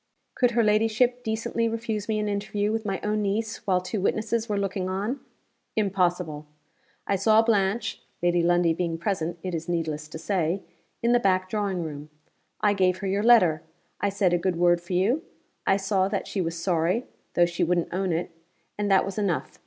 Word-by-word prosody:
Could 245 -2 +2
her 235 - +5
ladyship 225 +4 +2
decently 225 +1 -1
refuse 225 -2 -3
me 215 - +1
an 210 0 -1
interview 205 0 -1
with 220 -1 -2
my 195 -1 -1
own 210 0 0
niece, 210 +2 -1
while 185 -2 +3
two 185 +3 -4
witnesses 220 +3 0
were 205 - 0
looking 195 -1 -2
on? 205 +8 -2 0.6
Impossible. 180 -7 0 0.6
I 200 - +1
saw 215 +3 +4
Blanche 205 -1 0 0.2
(Lady 175 0 +3
Lundie 175 -1 +3
being 165 -1 -2
present, 170 -1 -2
it 185 -1 -3
is 165 +1 -4
needless 155 -3 -2
to 155 - -8
say) 180 +1 -1 0.4
in 235 - +3
the 245 - +5
back 185 -3 +1
drawing 200 -5 -1
room. 150 -1 -7 0.5
I 205 -1 +4
gave 185 -2 +2
her 195 +1 -4
your 195 +2 +1
letter; 210 -9 +5 0.4
I 200 - +1
said 195 -2 +1
a 175 - +3
good 180 +1 0
word 175 0 +3
for 175 +2 -6
you; 210 - +2 0.5
I 195 - +4
saw 195 -1 +1
that 200 0 -2
she 195 - -2
was 165 -1 -3
sorry, 175 +6 +1 0.3
though 175 - +5
she 170 0 -1
wouldn't 175 0 0
own 190 0 0
it 170 +2 -2 0.5
and 205 0 0
that 195 -1 +4
was 195 +2 -4
enough. 195 -6 -2
195 Hz, 190 wpm, -26 LUFS, 175-215 Hz, 0.6 s, her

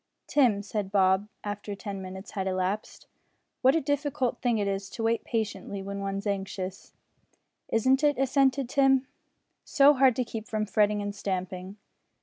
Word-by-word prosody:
"Tim," 235 -8 +3
said 205 -1 -3
Bob, 190 0 +3 0.2
after 205 0 -5
ten 200 -1 -6
minutes 190 +1 -8
had 190 -2 -3
elapsed, 185 +2 -2 0.6
"what 260 +3 +5
a - - +4
difficult 285 -3 -1
thing 240 -3 +2
it 205 -1 0
is 195 0 -2
to 230 - -6
wait 230 0 +1
patiently 210 -3 -3
when 200 0 -5
one's 195 +1 -3
anxious!" 195 -1 -4 0.7
"Isn't 260 +5 +2
it!" 290 -1 +3
assented 270 0 +2
Tim, 270 0 +3 0.6
"so 285 +1 +5
hard 265 -3 +4
to 255 - 0
keep 225 -1 -6
from 215 -2 -1
fretting 210 0 +2
and 205 0 -3
stamping." 185 -1 -4
210 Hz, 155 wpm, -28 LUFS, 195-255 Hz, 0.7 s, what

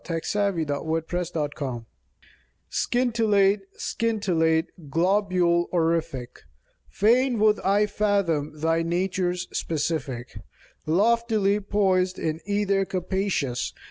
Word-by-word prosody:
C/iflffiaiim. 170 +1 -1
THE 145 -1 -2
LITTLE 165 +2 -2
STAR 145 -7 -4 0.9
Scintillate, 220 -5 +2 0.2
scintillate, 170 -8 -1
globule 175 0 +2
orific. 160 -7 -1 0.5
Fain 240 +4 +3
would 210 0 +3
I 200 +2 +2
fathom 180 -8 0
thy 165 +1 +1
nature's 180 +1 -1
specific 145 -6 -3 0.5
Loftily 210 +2 +2
poised 190 -3 +1
in 160 0 -2
ether 200 -1 +1
capacious. 185 -9 -2
180 Hz, 85 wpm, -25 LUFS, 160-205 Hz, 0.9 s, Fain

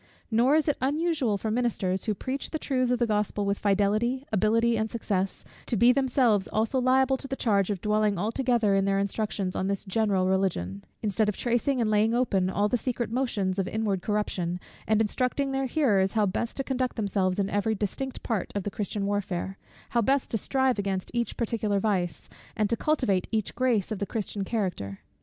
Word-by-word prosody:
Nor 240 +6 +4
is 315 0 +2
it 295 - +1
unusual 290 -5 +1
for 220 +2 -3
ministers, 210 -6 0
who 215 - 0
preach 265 +6 -4
the 315 - -2
truths 255 -4 0
of 250 - +2
the 240 - +2
Gospel 210 -1 0
with 200 0 0
fidelity, 210 +6 +1
ability, 225 +3 +3
and 220 0 -1
success, 195 -4 -2 0.2
to 235 - 0
be 240 +4 +6
themselves 250 -6 +2
also 225 +5 0
liable 265 +1 +3
to 275 - -7
the 270 - -3
charge 200 -6 +1
of 200 -4 -2
dwelling 210 -1 +1
altogether 225 +1 +1
in 195 0 +2
their 195 0 +2
instructions 200 -1 -2
on 190 - -1
this 200 -1 -2
general 195 -2 +1
Religion: 170 - 0 0.2
instead 210 0 +1
of 210 - -3
tracing 245 +3 +1
and 220 -2 +1
laying 215 +2 +3
open 195 -7 +1
all 205 +2 +1
the 245 - +1
secret 240 -2 -2
motions 210 -7 0
of 190 - 0
inward 205 -3 -1
corruption, 180 -4 -1 0.3
and 220 0 +3
instructing 255 +5 0
their 270 0 0
hearers 210 -10 +2
how 215 -2 +3
best 205 +4 -2
to 270 - -1
conduct 260 -1 -1
themselves 195 -4 0
in 200 -1 +1
every 205 +2 0
distinct 245 +6 -4
part 220 -6 -2
of 200 - -1
the 205 - -3
Christian 205 0 -3
warfare; 195 -2 -2 0.3
how 235 - +3
best 270 +4 +1
to 225 - +1
strive 265 0 +1
against 195 -2 -2
each 235 -1 -2
particular 220 -3 0
vice, 190 -4 -1 0.3
and 215 -1 0
to - - +3
cultivate 230 -10 +1
each 220 -3 -1
grace 235 -5 +1
of 215 - -2
the 200 - -2
Christian 205 -2 -3
character. 180 - -3
215 Hz, 195 wpm, -27 LUFS, 195-245 Hz, 0.3 s, be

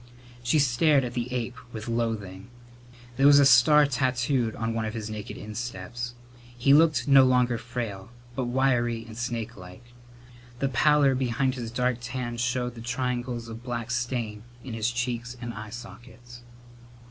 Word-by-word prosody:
She 120 +6 +2
stared 140 +1 +3
at 120 -1 -4
the 120 0 -3
ape 125 -1 -3 0.2
with 110 -1 -7
loathing. 110 -5 -3 0.7
There 135 +1 +5
was 145 0 +8
a 140 - +6
star 140 +4 +7
tattooed 125 -3 0
on 115 0 -2
one 115 0 -1
of 110 +1 -4
his 110 -1 -5
naked 105 -1 -6
insteps. 120 +2 -6 0.4
He 135 +3 +4
looked 150 -4 +4
no 135 -1 +8
longer 125 -2 +2
frail, 115 -6 -5 0.3
but 130 - -1
wiry 120 -2 +1
and 110 -1 -11
snakelike. 115 -2 -6 0.6
The 135 +2 0
pallor 145 +1 +4
behind 130 +1 0
his 120 -3 -5
dark 125 +1 0
tan 125 -1 -4
showed 125 +1 -1
the 115 - -10
triangles 120 0 -3
of 115 0 -8
black 120 -2 -4
stain 120 -3 -2 0.2
in 125 - -7
his 115 0 0
cheeks 120 0 -3
and 120 -1 -5
eye 110 0 -8
sockets. 120 +1 -11
120 Hz, 160 wpm, -26 LUFS, 115-125 Hz, 0.7 s, was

